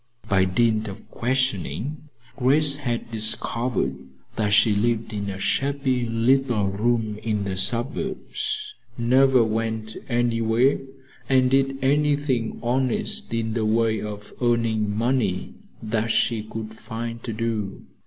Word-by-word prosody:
By 95 -2 +3
dint 110 +3 +1
of 100 - -9
questioning, 130 - -2 0.3
Grace 140 +2 +4
had 120 -5 -3
discovered 110 - 0 0.4
that 105 -2 0
she 110 +1 +5
lived 110 +1 0
in 100 -1 -3
a 95 - -4
shabby 135 +2 0
little 115 -2 +2
room 110 +1 0
in 105 -2 -1
the 95 -1 -3
suburbs, 120 - -2 0.2
never 130 +1 +4
went 110 0 -2
anywhere 120 +1 +2 0.5
and 130 -1 +4
did 135 0 +2
anything 145 -4 +1
honest 125 +1 0
in 115 -1 -1
the 115 -1 0
way 110 0 +2
of 105 -1 -7
earning 115 -3 +1
money 120 +3 0 0.3
that 110 +1 0
she 115 0 +2
could 110 0 -7
find 115 +1 -6
to 115 - -4
do. 110 -3 -3
115 Hz, 125 wpm, -24 LUFS, 110-130 Hz, 0.5 s, she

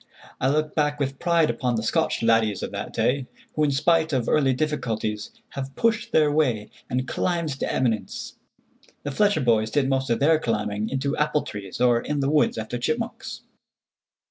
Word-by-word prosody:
I 130 - +2
look 155 +1 0
back 150 -1 0
with 135 -1 -2
pride 170 -2 +3
upon 125 -2 -1
the 110 - -1
Scotch 115 - 0
laddies 115 -3 +2
of - - -4
that - - -5
day, 130 0 0 0.3
who 155 - +1
in 150 - +3
spite 160 +3 +2
of 125 -3 0
early 140 -3 +3
difficulties 120 -7 -2 0.2
have 135 0 -6
pushed 230 -2 +1
their 150 -2 +4
way 125 -9 +1 0.2
and 130 +1 -1
climbed 170 -3 -1
to - - -1
eminence. 115 -5 -1 0.7
The 145 - -3
Fletcher 205 +7 +2
boys 110 -3 +2
did 135 +3 +1
most 135 0 0
of 115 - +1
their 155 +2 +4
climbing 105 -3 -1
into 140 +2 -1
apple 150 0 +1
trees, 100 -2 -7
or 120 -1 +4
in 150 -1 -2
the 140 +1 +1
woods 150 -5 +3
after 110 +2 -4
chipmunks. 230 - -3
135 Hz, 180 wpm, -24 LUFS, 115-150 Hz, 0.7 s, their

